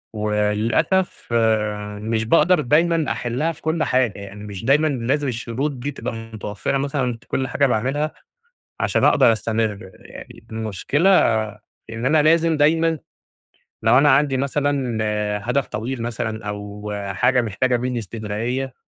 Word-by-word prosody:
وللأسف 105 - 0
آآ، 105 -2 0
مش 110 0 -1
باقدر 170 +8 +4
دايمًا 160 +3 +2
أحلها 125 +7 -1
في 160 - -14
كل 160 0 0
حاجة، 125 -5 +1
يعني 100 +1 -9
مش 100 0 -7
دايمًا 150 +5 +4
لازم 140 +1 -1
الشروط 120 +4 -2
دي 140 +2 -5
تبقى 125 -2 -5
متوفّرة 110 +1 -4
مثلًا 135 -4 -1
في - - -24
كل 130 0 -1
حاجة 140 +3 +1
باعملها، 135 +6 0 0.7
عشان - - +1
أقدر 115 - +5
أستمر. 110 -3 -2
يعني - - -13
المشكلة 110 - 0 0.8
إن 115 +2 -4
أنا 150 +2 +4
لازم 165 +1 +3
دايمًا 160 +2 +3 0.9
لو 115 +3 +5
أنا 145 +2 +5
عندي 140 0 +3
مثلًا 140 -3 -1
آآ 105 -1 -1
هدف 130 +4 0
طويل 120 +4 -4
مثلًا 110 -2 -4
أو 105 0 -6 0.2
حاجة 125 +4 +3
محتاجة 120 +3 0
مني 125 0 -2
إستمرارية، 115 +5 -4
120 Hz, 140 wpm, -21 LUFS, 110-140 Hz, 0.9 s, أقدر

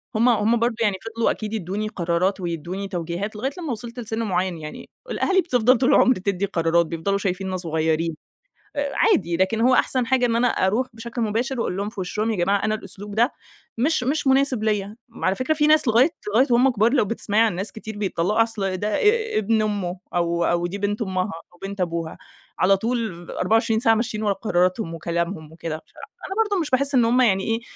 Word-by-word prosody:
هُم 230 +3 +4
هُم 225 0 +2
برضه 235 0 +1
يعني 205 -3 +2 0.2
فضلوا 230 - +2
أكيد 215 0 -5
يدّوني 210 +1 -3
قرارات 180 -1 0
ويدّوني 175 +3 -4
توجيهات 175 +3 -4
لغاية 260 +6 -2
لمّا 325 -7 -4
وصَلت 235 +2 -5
لسِن 225 -1 -4
مُعيّن 185 -3 -1
يعني. 150 -1 -9 0.2
الأهالي 380 -4 +2
بتفضَل 250 -6 +3
طُول 255 - +2
العُمر 255 - +5
تدّي 195 0 -1
قرارات 170 -2 +2
بيفضلوا 170 +5 -1
شايفيننا 190 -1 -2
صغيّرين. 160 -1 -1 0.6
آآ 285 -1 -1
عادي 170 -2 +2
لكن 205 +4 +1
هو 255 +2 +4
أحسن 255 -1 +2
حاجة 255 0 +2
إن 230 -1 +1
أنا 245 +1 +3
أرُوح 220 +8 +1
بشكْل 235 +1 -6
مباشِر 235 +4 -1
وأقول 185 - -2
لهم 200 +1 -2
في 215 -2 -10
وشّهم 210 +5 -1
"يا - - -1
جماعة 195 +3 +1
أنا 215 0 +1
الأسلوب 205 -1 -8
ده 235 +5 +3 0.5
مش 275 +3 +1
مش 280 +3 0
مناسب 265 -3 +2
ليَّ." 210 -1 -1 0.2
على 190 -3 0
فكرة 255 +5 0
في 300 -1 +2
ناس 305 -3 +4
لغاية 240 +7 +5 0.2
لغاية 255 +5 +4
وهمّ 250 +3 +5
كبار 230 +1 +2
لو 255 - +3
بتسمَعي 210 0 0
عن 225 -6 +2
ناس 195 +4 -3
كتير 220 -1 -8
بيتطلّقوا 205 +2 +1
أصل 200 -5 -3
ده 205 +3 -2
ا 440 - +2
ابن 220 +1 +2
أمه 195 -4 -2 0.2
أو 170 0 +1
أو 175 0 +1
دي 190 +3 -5
بنت 205 +2 -2
أمها 190 -1 -1 0.2
أو 175 - -20
بنت 195 -1 -4
أبوها، 170 -2 -3 0.4
على 195 +1 +4
طول 220 -6 -3
24 220 +3 +1
ساعة 225 -1 +4
ماشيين 220 -1 -2
ورا 205 -1 +2
قراراتهم 185 -2 0
وكلامهم 170 -1 -3
وكده 160 -1 -5
مش - - -29 0.4
أنا 385 - -5
برضه 405 -4 -1
مش 305 - -3
باحس 275 +2 +1
إن 240 - +5
هُم 245 +3 +3
يعني 195 -5 +3
إيه 225 +1 -1
210 Hz, 205 wpm, -23 LUFS, 185-235 Hz, 0.6 s, العُمر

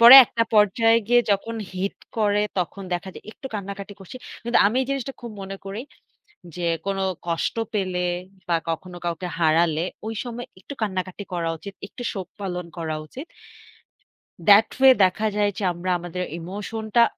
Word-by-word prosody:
পরে 240 +3 +13
একটা 230 - 0
পর্যায়ে 225 +2 +5
গিয়ে 245 0 +6
যখন 205 +3 0 0.2
hit 185 +2 -2 0.2
করে 210 -1 +3 0.2
তখন 185 +2 -2
দেখা 175 +2 -2
যায় - - -11
একটু 265 - -9
কান্নাকাটি 200 0 -5
করছি। 195 +6 -9 0.3
কিন্তু 235 +1 +3
আমি 215 +4 +1
এই - - -4
জিনিসটা 275 -1 -2
খুব 235 - -7
মনে 195 0 -6
করি 195 +4 -5 0.7
যে, 175 -1 -2 0.2
কোন 195 0 0 0.3
কষ্ট 170 +5 -1 0.2
পেলে 185 -3 0 0.4
বা 170 - +3
কখনো 175 +2 -5
কাউকে 170 +1 -2
হারালে 160 0 +3 0.2
ওই 225 - -3
সময় 240 0 -6
একটু 280 - -8
কান্নাকাটি 185 -1 -2
করা 170 -1 -1
উচিত, 200 +4 -9
একটু 245 - -9
শোক 190 -3 -5
পালন 180 -3 -3
করা 160 -2 -2
উচিত। 265 - -8 1.2
That 205 +2 +8
way 265 0 +10
দেখা 200 +4 +2
যায় 205 -1 +2
যে, 205 - -3
আমরা 175 +2 -4
আমাদের 175 +1 -4 0.2
emotion 205 +6 -5
টা 235 - +8
195 Hz, 170 wpm, -24 LUFS, 180-225 Hz, 1.2 s, পরে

